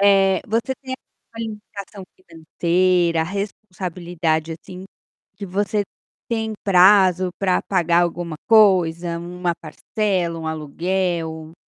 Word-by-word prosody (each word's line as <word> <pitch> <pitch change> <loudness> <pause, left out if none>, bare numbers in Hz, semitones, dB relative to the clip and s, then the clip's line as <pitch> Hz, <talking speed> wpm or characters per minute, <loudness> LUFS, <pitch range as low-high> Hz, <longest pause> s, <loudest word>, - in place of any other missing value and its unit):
Eh, 195 -2 +4
você 230 +4 -1
tem 260 0 -6 0.4
educação 210 -3 -7
financeira, 170 0 +1
responsabilidade 175 -4 -3
assim, 185 +2 -10 0.5
que 205 - -7
você 205 +2 0 0.4
tem 220 -1 -2
prazo 185 -1 +5
para 185 -2 +2
pagar 175 -3 +2
alguma 170 -1 -2
coisa, 180 -6 +4
uma 175 0 -3
parcela, 175 +2 -2
um 160 - -6
aluguel? 160 +1 -2
180 Hz, 100 wpm, -21 LUFS, 170-200 Hz, 0.5 s, prazo